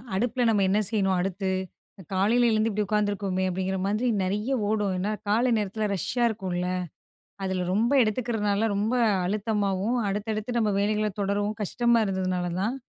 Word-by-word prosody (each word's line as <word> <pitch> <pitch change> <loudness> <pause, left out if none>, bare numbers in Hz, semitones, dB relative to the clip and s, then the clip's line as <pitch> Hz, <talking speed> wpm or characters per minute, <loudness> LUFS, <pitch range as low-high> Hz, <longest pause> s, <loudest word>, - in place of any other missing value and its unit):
அடுப்பில 245 +4 0
நம்ம 205 -3 +3
என்ன 200 +2 +3
செய்யணும், 195 -4 +1
அடுத்து? 190 +1 -1 0.6
காலையில 225 +6 +3
எழுந்து 220 +1 +2
இப்படி 210 0 -1
உட்காந்துருக்கோமே?" 205 -2 0
அப்படீங்கிற 190 +1 -2
மாதிரி 215 +5 0 0.2
நெறைய 210 +6 -1 0.2
ஓடும். 210 -3 0
ஏன்னா, 195 +4 -1 0.2
காலை 235 +4 +3
நேரத்தில 210 +1 -1
ரஷ்ஷா 240 +7 -1
இருக்கும்ல்ல. 185 -5 -3 0.8
அதுல 190 -1 -1
ரொம்ப 230 +6 +2
எடுத்துக்கிறனால 215 -2 0
ரொம்ப 215 +4 0 0.3
அழுத்தமாவும், 205 +2 0
அடுத்தடுத்து 215 +3 -3
நம்ம 215 -2 +2
வேலைகளை 210 +1 +1
தொடரவும் 205 +2 -1
கஷ்டமா 235 +3 +2
இருந்ததுனாலதான், 185 +3 -1
210 Hz, 135 wpm, -26 LUFS, 190-220 Hz, 0.8 s, நம்ம